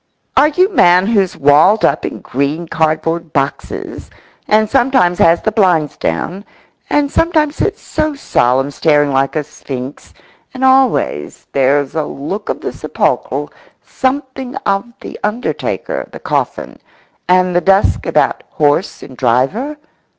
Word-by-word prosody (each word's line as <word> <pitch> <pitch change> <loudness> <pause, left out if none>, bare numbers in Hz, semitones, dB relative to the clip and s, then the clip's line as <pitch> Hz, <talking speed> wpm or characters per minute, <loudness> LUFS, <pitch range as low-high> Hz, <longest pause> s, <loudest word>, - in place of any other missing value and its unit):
Are 295 - +6
you 360 +5 +2
man 180 - +5
who's 200 -4 +1
walled 155 +10 +4
up - - +1
in - - -8
green 145 +6 -2
cardboard 160 +1 -1
boxes, 140 0 -3 0.4
and 215 +1 +3
sometimes 250 -8 +2
has 165 +1 +4
the 215 - +1
blinds 180 -8 +2
down, 175 - -3 0.5
and 290 -1 +1
sometimes 310 -3 +1
sits - - -2
so 310 -1 -2
solemn 135 - +1
staring 145 -1 +2
like 135 0 +1
a 155 - 0
sphinx, 135 -2 -8 0.4
and 260 - -4
always 260 - +1
there's 140 +1 +1
a 155 -2 -1
look 190 +11 -6
of - - -3
the - - -4
sepulchral, - - -2 0.3
something 260 -1 -3
of 200 +4 -1
the - - -9
undertaker, 250 - -3
the - - -9
coffin, - - -3 0.5
and 180 0 +3
the 175 - +3
dusk 195 +2 +2
about - - +1
horse 150 +5 0
and 130 - -11
driver? 135 - 0
180 Hz, 135 wpm, -15 LUFS, -, 0.5 s, Are